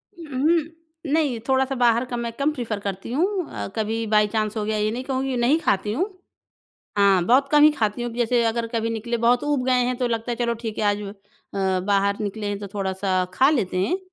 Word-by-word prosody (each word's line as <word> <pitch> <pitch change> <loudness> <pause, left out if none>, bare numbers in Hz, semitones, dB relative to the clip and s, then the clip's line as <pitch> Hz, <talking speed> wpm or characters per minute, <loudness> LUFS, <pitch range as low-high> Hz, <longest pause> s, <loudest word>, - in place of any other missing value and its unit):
हुँ, 305 -7 -6
हुँ। 325 0 -1
नहीं 295 -7 +1
थोड़ा-सा 265 0 +1
बाहर 240 -1 +3
का 245 -1 -4
मैं 235 -1 -3
कम 280 +5 0
प्रेफ़र 230 -7 -4
करती 200 +1 -5
हूँ, 360 +6 0
अ, - - -5
कभी 225 +1 -1
बाय 210 0 +4
चांस 215 0 -2
हो 215 - -1
गया, 215 0 -1
ये 210 0 0
नहीं 245 +3 -4
कहूँगी 265 -1 -2
नहीं 250 +7 +3
खाती 205 - 0
हूँ। 365 - -1 0.9
हाँ, 195 -3 +4
बहुत 270 +3 +4
कम 295 0 +6
ही 305 - +8
खाती 220 -4 -1
हूँ 240 -1 -3
जैसे 240 0 +2
अगर 230 +1 0
कभी 230 0 0
निकले 230 +1 -2
बहुत 235 +2 +2
ऊब 290 -3 0
गए 260 - +3
हैं। 250 0 -1
तो 250 0 0
लगता 230 +1 -2
है - - -3
चलो 235 -1 0
ठीक 225 -1 -6
है - - 0
आज 205 0 +1 0.5
अ, 190 -1 0
बाहर 200 0 +2
निकले 210 0 -3
हैं 205 0 -2
तो 205 - -6
थोड़ा-सा 190 -1 0
खा 265 +6 +5
लेते 205 -12 0
हैं। 330 - 0
235 Hz, 225 wpm, -23 LUFS, 210-265 Hz, 0.9 s, ही